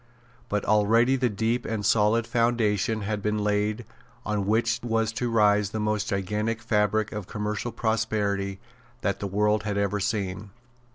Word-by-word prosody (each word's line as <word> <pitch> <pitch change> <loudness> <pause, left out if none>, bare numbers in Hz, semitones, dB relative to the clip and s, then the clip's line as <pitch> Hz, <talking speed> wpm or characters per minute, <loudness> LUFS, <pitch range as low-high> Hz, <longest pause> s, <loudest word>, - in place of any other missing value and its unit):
But 105 -1 -1
already 115 +5 +4
the 125 -2 +1
deep 115 +4 -1
and 110 -2 -3
solid 110 +1 +3
foundation 115 -2 +1
had 105 0 -2
been 105 +1 0
laid 105 +2 0 0.4
on 105 -2 -1
which 115 +2 +1
was 115 -1 0
to 120 +1 -2
rise 105 -3 +3
the 110 - -4
most 105 -1 -1
gigantic 105 +4 -1
fabric 110 0 +1
of 105 -4 -6
commercial 105 +3 -3
prosperity 105 -4 -1 0.4
that - - -1
the 100 - -3
world 105 +2 +1
had 105 -1 -3
ever 100 0 0
seen. 100 0 -2
105 Hz, 155 wpm, -26 LUFS, 105-115 Hz, 0.4 s, already